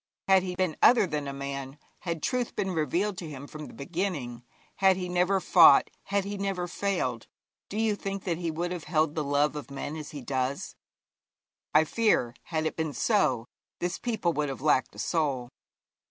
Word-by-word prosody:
Had 190 -1 +6
he 180 -1 -4
been 180 -4 0
other 240 -4 +7
than 150 -4 -3
a - - -3
man, 140 0 -5 0.2
had 170 -3 -4
truth 250 -2 -1
been 190 - -1
revealed 180 +4 0
to 165 - -6
him 140 -1 -8
from 155 +1 -8
the - - -12
beginning, 145 -7 -3 0.3
had 190 -1 +4
he 180 -1 -3
never 180 +2 +2
fought, 165 -6 +7
had 200 0 0
he 200 0 -4
never 195 -3 -1
failed, 170 - -2 0.4
do 205 - -5
you 220 -1 +2
think 195 -1 -5
that 170 -3 -2
he 170 -2 -2
would 170 +3 -2
have 175 -4 -5
held 155 -1 +1
the 155 - -1
love 145 +1 +1
of 145 -1 -6
men 140 +2 -5
as 155 -2 -7
he 145 -3 -8
does? 130 +1 -2 1.0
I 155 - +7
fear, 160 - +1
had 160 -2 -2
it 155 - -1
been 160 -2 -2
so, 130 - +2 0.3
this 175 +1 -2
people 220 -8 0
would 150 -2 -1
have 135 - -6
lacked 150 -4 +2
a - - -10
soul. 140 -7 0
160 Hz, 195 wpm, -28 LUFS, 145-190 Hz, 1.0 s, other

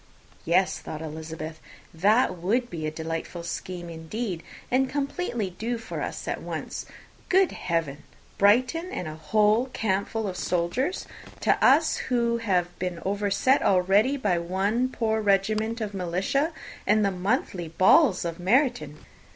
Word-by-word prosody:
"Yes," 185 +3 +2
thought 155 0 -7
Elizabeth; 155 0 -6 0.3
"that 205 +8 +3
would 225 +8 0
be 155 -2 -3
a - - -2
delightful 165 +2 -5
scheme, 175 +1 -5
indeed, 170 +3 -4 0.3
and 260 +1 +2
completely 280 - -2
do 230 +7 -3
for 225 - -6
us - - -5
at - - -2
once. - - -5 0.4
Good 380 0 +4
Heaven! 165 -5 -2 0.4
Brighton 255 - +3
and 175 - -4
a 155 - -5
whole 210 +9 +2
campful 210 +1 -1
of 185 -2 -4
soldiers, 180 - -1 0.4
to - - +2
us, - - +5
who 235 -2 0
have 180 -5 0
been 180 -2 -3
overset 205 +6 +2
already 195 +8 +3
by 200 -9 +1
one 195 +8 0
poor 220 -3 0
regiment 215 +3 +1
of 210 -2 -3
militia, 190 - 0 0.4
and 210 0 +4
the 195 - +2
monthly 185 -2 -1
balls 185 - +4
of 170 +1 -4
Meryton!" 185 - +1
195 Hz, 140 wpm, -26 LUFS, 170-235 Hz, 0.4 s, us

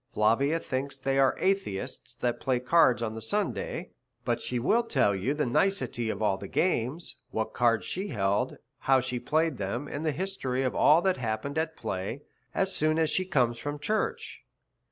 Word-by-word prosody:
Flavia 135 +9 +2
thinks 135 -1 -2
they 135 +1 0
are 135 -1 +4
atheists 190 - -2
that 120 -1 -1
play 130 -2 +1
at 125 +1 -4
cards 125 -7 +4
on 110 -1 -2
the 110 - -6
Sunday, 185 - -2 0.3
but 120 -1 0
she 125 - -3
will 205 - +3
tell 135 - +2
you 105 +10 -1
the 150 - 0
nicety 125 - 0
of 110 0 -2
all 95 -2 +2
the 100 - -7
games, 160 - 0
what 110 0 -2
cards 115 -5 +2
she 190 +3 -3
held, 100 - 0 0.2
how 135 -1 +4
she 125 -1 -3
played 155 -1 0
them, 115 +8 -3
and 145 +2 -5
the 155 - +1
history 145 -6 -2
of 130 - 0
all 155 +3 +5
that 190 -1 +2
happened 125 +5 -2
at 160 0 -2
play, 100 +10 -4 0.3
as 195 0 +1
soon 155 +1 +2
as 160 -1 +2
she 185 - +1
comes 125 -9 +1
from 145 +3 -4
church. 215 +9 -2
135 Hz, 190 wpm, -28 LUFS, 115-160 Hz, 0.3 s, all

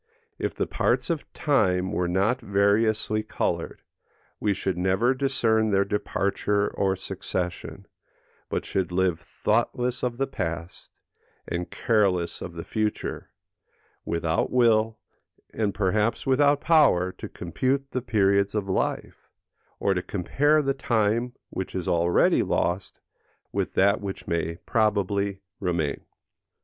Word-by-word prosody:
If - - -2
the - - 0
parts - - 0
of 160 -3 -4
time 95 -10 +1
were 90 - 0
not 100 +8 +1
variously 110 +2 +2
coloured, 110 - -3 0.6
we 105 - +1
should 95 -1 -1
never 95 +8 +2
discern 120 -5 +1
their 100 -1 +3
departure 100 0 0
or 95 -1 0
succession, 90 -2 -4 0.6
but - - -2
should 95 -2 -1
live 90 -2 +1
thoughtless 120 +6 -1
of 120 -1 -2
the 135 - +1
past, 85 - -5 0.6
and 90 0 -3
careless 95 -6 +1
of 85 - -6
the 85 -1 -6
future, 110 -1 -3 0.7
without 85 0 0
will, 115 -3 +3 0.6
and 105 -2 0
perhaps 105 +3 0
without 145 +2 +3
power, 140 - +4
to - - -6
compute 135 +10 -2
the 130 - -1
periods 100 -4 +2
of 105 -2 -1
life, 95 - -2 0.5
or 100 - +2
to 90 - -1
compare 145 - +1
the 135 0 +1
time 120 -1 0 0.2
which 95 - -5
is 90 -2 -3
already 85 0 +3
lost 90 +2 -1 0.5
with - - -2
that 100 +2 +3
which 100 -1 -6
may 85 0 -1
probably 100 -3 +1 0.2
remain. 85 -6 -1
100 Hz, 125 wpm, -26 LUFS, 90-115 Hz, 0.7 s, power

